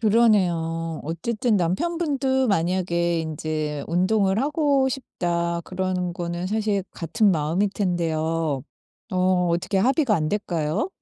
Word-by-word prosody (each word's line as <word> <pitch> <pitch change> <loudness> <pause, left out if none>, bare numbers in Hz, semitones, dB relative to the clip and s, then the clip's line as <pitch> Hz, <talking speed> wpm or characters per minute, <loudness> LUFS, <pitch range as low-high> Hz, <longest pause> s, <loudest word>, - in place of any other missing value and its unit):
그러네요. 175 -8 +2
어쨌든 210 - 0
남편 190 - 0
분도 265 -5 +1
만약에 170 -2 +1
인제 155 -2 -3
'운동을 190 +3 +2
하고 285 -2 +2
싶다.' 170 -9 -2
그런 185 -1 -2
거는 175 +1 -4
사실 210 -1 0
같은 205 +5 +1
마음일 165 +5 +1
텐데요. 165 -6 -1 0.5
어 185 -1 +2
어떻게 175 +4 0
합의가 260 - +3
안 155 -4 0
될까요? 170 - -1
180 Hz, 260 characters per minute, -24 LUFS, 165-215 Hz, 0.5 s, 합의가